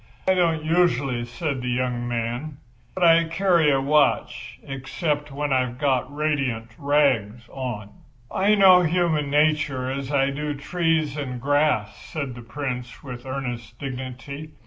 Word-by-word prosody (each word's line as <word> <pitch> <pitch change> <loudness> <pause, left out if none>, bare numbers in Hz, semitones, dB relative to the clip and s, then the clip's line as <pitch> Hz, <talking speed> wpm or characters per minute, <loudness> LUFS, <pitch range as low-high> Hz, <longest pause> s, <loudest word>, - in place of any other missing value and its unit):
"I 190 - +5
don't 165 -4 +1
usually," 145 -8 +1
said 130 +3 -3
the 125 - -3
young 120 -1 -1
man. 120 +5 -3 0.4
"I 170 -2 +5
carry 170 -2 +3
a 135 -1 +3
watch 145 +1 +1
except 145 +2 -3
when 145 0 -1
I've 125 -2 0
got 130 -2 +1
my 145 - -12
radiant 130 -7 -1
rags 130 -6 +1
on." 120 -6 -5 0.4
"I 205 +2 +3
know 190 -3 +7
human 165 -4 +1
nature 145 -3 +1
as 135 +1 -4
I 140 -1 +2
do 150 +1 -3
the - - -11
trees 160 -2 0
and 130 -4 -4
grass," 145 -5 +1
said 140 -6 -5
the 120 - -9
Prince, 125 +1 -5
with 125 -2 -8
earnest 125 -4 -5
dignity. 135 +2 -6
140 Hz, 145 wpm, -24 LUFS, 125-155 Hz, 0.4 s, know